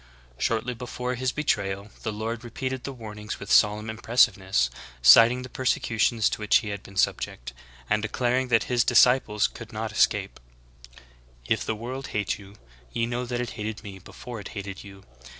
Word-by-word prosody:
"^ -, -, -25 dB, 0.3 s
10. -, -, -28 dB
Shortly 115 Hz, -, 0 dB
before 125 Hz, +1 st, -4 dB
His 125 Hz, 0 st, -1 dB
betrayal 100 Hz, -9 st, -1 dB
the 110 Hz, -, -3 dB
Lord 110 Hz, +3 st, -4 dB
repeated 130 Hz, +2 st, -4 dB
the 140 Hz, -, -4 dB
warning 105 Hz, -4 st, -9 dB
with 100 Hz, -, -7 dB
solemn 105 Hz, +1 st, +4 dB
impressiveness, 105 Hz, -, +2 dB, 0.3 s
citing 115 Hz, -, +8 dB
the -, -, -7 dB
persecutions 115 Hz, -4 st, +1 dB
to -, -, -3 dB
which 105 Hz, -1 st, +2 dB
He 110 Hz, -, +3 dB
had 100 Hz, -1 st, -5 dB
been 100 Hz, -, -14 dB
subject, -, -, -1 dB, 0.3 s
and 110 Hz, 0 st, +1 dB
declaring 125 Hz, +3 st, 0 dB
that 115 Hz, -2 st, +3 dB
His 120 Hz, -1 st, +1 dB
dis -, -, +5 dB
ciples 125 Hz, -5 st, +1 dB
could -, -, -10 dB
not -, -, -4 dB
escape: -, -, +1 dB, 1.1 s
"If -, -, 0 dB
the 110 Hz, -, -2 dB
world 130 Hz, +5 st, -6 dB
hate 105 Hz, 0 st, -1 dB
you, 100 Hz, 0 st, -14 dB, 0.4 s
ye 115 Hz, -, 0 dB
know 120 Hz, +1 st, -3 dB
that 120 Hz, 0 st, -2 dB
it 120 Hz, -, -4 dB
hated 110 Hz, 0 st, -5 dB
me 100 Hz, -2 st, -9 dB
before 120 Hz, +5 st, -9 dB
it 100 Hz, -, -8 dB
hated 95 Hz, -1 st, -6 dB
you. 95 Hz, -1 st, -13 dB
110 Hz, 185 wpm, -26 LUFS, 100-125 Hz, 1.1 s, citing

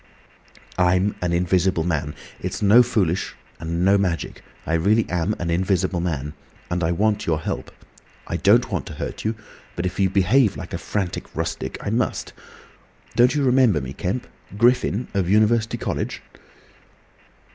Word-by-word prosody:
"I'm 90 Hz, +3 st, +3 dB
an 90 Hz, -1 st, 0 dB
Invisible 90 Hz, 0 st, +1 dB
Man. 80 Hz, -3 st, -2 dB, 0.2 s
It's -, -, -4 dB
no 105 Hz, +5 st, +7 dB
foolishness, 95 Hz, -6 st, 0 dB, 0.2 s
and 85 Hz, +2 st, -1 dB
no 100 Hz, +1 st, +5 dB
magic. 90 Hz, -4 st, -2 dB, 0.2 s
I 80 Hz, -, -2 dB
really 105 Hz, +7 st, +2 dB
am 90 Hz, +4 st, 0 dB
an 85 Hz, -1 st, -3 dB
Invisible 95 Hz, 0 st, +1 dB
Man. 75 Hz, -4 st, -3 dB, 0.4 s
And 90 Hz, 0 st, 0 dB
I 80 Hz, -, +1 dB
want 105 Hz, +4 st, 0 dB
your 80 Hz, -2 st, +1 dB
help. -, -, -4 dB, 0.6 s
I -, -, -3 dB
don't -, -, +3 dB
want -, -, -2 dB
to -, -, -7 dB
hurt -, -, -5 dB
you, 110 Hz, +1 st, -1 dB, 0.4 s
but 85 Hz, -, -3 dB
if 90 Hz, +1 st, -3 dB
you 95 Hz, -1 st, +3 dB
behave 100 Hz, +5 st, +3 dB
like -, -, -8 dB
a -, -, -3 dB
frantic 95 Hz, -4 st, -3 dB
rustic, -, -, -3 dB
I 100 Hz, -, -3 dB
must. 120 Hz, +3 st, -1 dB, 0.8 s
Don't 125 Hz, +4 st, +4 dB
you 145 Hz, -, +1 dB
remember 125 Hz, -, +4 dB
me, 65 Hz, -1 st, -6 dB
Kemp? 95 Hz, -, -3 dB, 0.3 s
Griffin, 120 Hz, -1 st, +2 dB
of 95 Hz, -3 st, 0 dB
University 110 Hz, +2 st, +3 dB
College?" -, -, -3 dB
95 Hz, 155 wpm, -22 LUFS, 85-110 Hz, 0.8 s, no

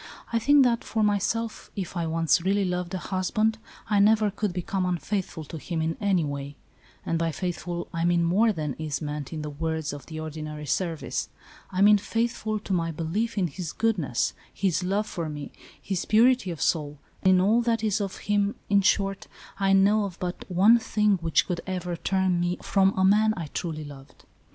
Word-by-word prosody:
I 230 Hz, -, +3 dB
think 285 Hz, +4 st, +5 dB
that, 235 Hz, -2 st, +2 dB
for 220 Hz, -1 st, -1 dB
myself, 215 Hz, +2 st, -1 dB
if 190 Hz, -1 st, -5 dB
I 170 Hz, -2 st, -1 dB
once 165 Hz, +1 st, +2 dB
really 195 Hz, +2 st, +1 dB
loved 180 Hz, -1 st, -2 dB
a -, -, 0 dB
husband, 215 Hz, +5 st, 0 dB, 0.3 s
I 210 Hz, -2 st, +2 dB
never 215 Hz, 0 st, +4 dB
could 210 Hz, 0 st, -2 dB
become 185 Hz, +2 st, -2 dB
unfaithful 180 Hz, -1 st, -2 dB
to 155 Hz, +2 st, -8 dB
him 170 Hz, +2 st, -4 dB
in 160 Hz, 0 st, -1 dB
any 195 Hz, -5 st, +2 dB
way; 140 Hz, 0 st, -5 dB, 0.5 s
and, 165 Hz, -, 0 dB
by 165 Hz, -1 st, 0 dB
faithful, 175 Hz, +1 st, -4 dB
I 165 Hz, 0 st, -1 dB
mean 175 Hz, 0 st, +3 dB
more 200 Hz, +7 st, +3 dB
than 155 Hz, -7 st, -3 dB
is 150 Hz, -3 st, -3 dB
meant 150 Hz, -2 st, -5 dB
in 155 Hz, -2 st, -4 dB
the 150 Hz, -, -5 dB
words 160 Hz, +1 st, -3 dB
of 145 Hz, -, -9 dB
the 160 Hz, -1 st, -6 dB
ordinary 155 Hz, -1 st, -6 dB
service. 150 Hz, -5 st, -2 dB, 0.4 s
I 185 Hz, 0 st, -2 dB
mean 210 Hz, 0 st, +7 dB
faithful 225 Hz, 0 st, -1 dB
to 195 Hz, -, -3 dB
my 165 Hz, -2 st, 0 dB
belief 170 Hz, +9 st, -2 dB
in 190 Hz, -, +2 dB
his 170 Hz, 0 st, -5 dB
goodness, 180 Hz, -, 0 dB, 0.2 s
his 190 Hz, -2 st, 0 dB
love 200 Hz, +4 st, 0 dB
for 170 Hz, -6 st, -4 dB
me, 145 Hz, -1 st, -7 dB, 0.3 s
his 190 Hz, -3 st, -3 dB
purity 235 Hz, -1 st, +4 dB
of 165 Hz, -3 st, -3 dB
soul, 150 Hz, -3 st, 0 dB, 0.2 s
in 185 Hz, -1 st, +5 dB
all 215 Hz, +6 st, +4 dB
that 230 Hz, -1 st, 0 dB
is 215 Hz, -1 st, +1 dB
of 195 Hz, -2 st, -4 dB
him 205 Hz, 0 st, +1 dB
— -, -, -37 dB
in 200 Hz, -1 st, +5 dB
short, 195 Hz, 0 st, +1 dB, 0.3 s
I 195 Hz, -1 st, +2 dB
know 205 Hz, +2 st, +4 dB
of 185 Hz, -3 st, -7 dB
but 180 Hz, -1 st, -5 dB
one 200 Hz, +6 st, +5 dB
thing 210 Hz, -3 st, +2 dB
which 165 Hz, -1 st, +2 dB
could 175 Hz, -2 st, -3 dB
ever 180 Hz, -2 st, -3 dB
turn 185 Hz, 0 st, +1 dB
me 175 Hz, +1 st, 0 dB
from 195 Hz, -1 st, +2 dB
a 190 Hz, -, +4 dB
man 215 Hz, +2 st, +4 dB
I 160 Hz, -5 st, -5 dB
truly 155 Hz, -3 st, -3 dB
loved. 140 Hz, -2 st, -13 dB
185 Hz, 200 wpm, -26 LUFS, 165-205 Hz, 0.5 s, mean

